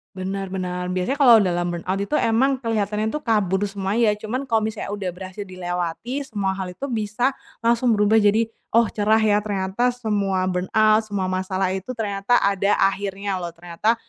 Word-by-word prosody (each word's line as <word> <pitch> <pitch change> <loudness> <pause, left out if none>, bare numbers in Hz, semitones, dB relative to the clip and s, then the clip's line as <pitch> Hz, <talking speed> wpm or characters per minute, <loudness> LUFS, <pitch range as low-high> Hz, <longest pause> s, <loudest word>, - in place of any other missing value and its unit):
Benar 190 0 -4
benar. 180 -1 -3
Biasanya 185 +8 -1
kalau 250 -6 +7
dalam 175 -3 0
burnout 175 +2 -2
itu 200 - -2
emang 255 +4 +2
kelihatannya 215 -3 -1
tuh 300 - -4
kabur 205 -4 +1
semua 195 0 -2
ya, 230 -2 +4
cuman 215 +5 -3
kalau 230 -5 +1
misalnya 215 -1 -4
udah 205 -2 -4
berhasil 190 +2 -8
dilewati, 180 +7 -3
semua 200 -5 -1
hal 190 -1 -4
itu 180 +8 -10
bisa 220 +3 0 0.3
langsung 235 0 +3
berubah 210 +2 +4
jadi, 210 +2 +4 0.3
"Oh 230 -1 +4
cerah 215 +1 +2
ya, 210 -1 +4
ternyata 205 +2 -1
semua 200 -5 0
burnout, 215 +4 +3
semua 195 -3 -2
masalah 185 0 -1
itu 190 +7 -4
ternyata 205 0 0
ada 200 0 +2
akhirnya 195 0 -1
loh, 170 -1 -6
ternyata 175 +7 0
205 Hz, 170 wpm, -22 LUFS, 185-220 Hz, 0.3 s, kalau